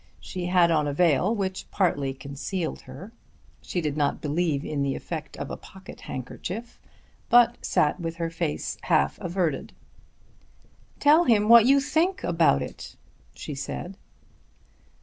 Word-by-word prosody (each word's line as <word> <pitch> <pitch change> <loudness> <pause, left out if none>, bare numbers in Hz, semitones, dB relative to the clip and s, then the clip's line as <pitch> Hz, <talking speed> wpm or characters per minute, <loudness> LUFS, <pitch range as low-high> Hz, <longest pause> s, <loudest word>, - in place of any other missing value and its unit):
She 180 -1 -5
had 180 -2 +4
on 150 -2 +2
a 145 - -2
veil 175 - +3
which 190 -3 -4
partly 145 -8 0
concealed 140 +6 -5
her. 195 +5 -10 0.5
She 175 - -3
did 150 -3 -2
not 145 -2 0
believe 150 -1 -1
in 145 -2 -2
the 140 -1 0
effect 155 -3 -6
of - - -5
a - - -3
pocket 190 0 -13
handkerchief, 185 - -7 0.5
but 240 0 +5
sat 150 +5 +1
with 165 -1 -4
her 165 -1 -3
face 80 - -3
half 70 +1 +1
averted. 170 -5 -2 1.3
"Tell 310 +4 +5
him 215 -3 +3
what 235 0 +8
you 275 +1 +6
think 320 +7 0
about 165 - +3
it," - - -9 0.4
she 150 - -6
said. 160 +6 -6
170 Hz, 145 wpm, -26 LUFS, 145-205 Hz, 1.3 s, what